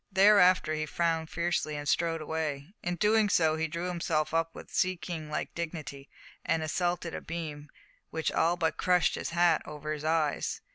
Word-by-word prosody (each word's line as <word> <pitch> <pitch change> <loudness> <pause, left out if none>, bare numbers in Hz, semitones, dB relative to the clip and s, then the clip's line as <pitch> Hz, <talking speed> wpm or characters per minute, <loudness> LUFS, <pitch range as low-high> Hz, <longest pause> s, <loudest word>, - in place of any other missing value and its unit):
Thereafter 190 -4 +5
he 155 0 -2
frowned 165 0 0
fiercely, 170 -2 -1
and 145 0 -5
strode 165 +1 +1
away. 155 +1 -3
In 175 0 -2
doing 210 +3 +3
so 160 -4 +3
he 160 0 -1
drew 170 +3 -4
himself 165 -3 -1
up 165 0 0
with - - -11
sea 185 -1 +1
king 165 -3 -6
like 150 - -3
dignity 155 -4 -6 0.3
and 160 - 0
assaulted 175 +1 -1
a - - -4
beam, 155 -3 -6 0.4
which 160 0 -1
all 170 +2 +2
but 160 -2 0
crushed 180 -1 +3
his - - -3
hat 170 -1 +3
over 150 0 -5
his 150 -1 -6
eyes. 155 -2 0
165 Hz, 180 wpm, -29 LUFS, 155-175 Hz, 0.4 s, Thereafter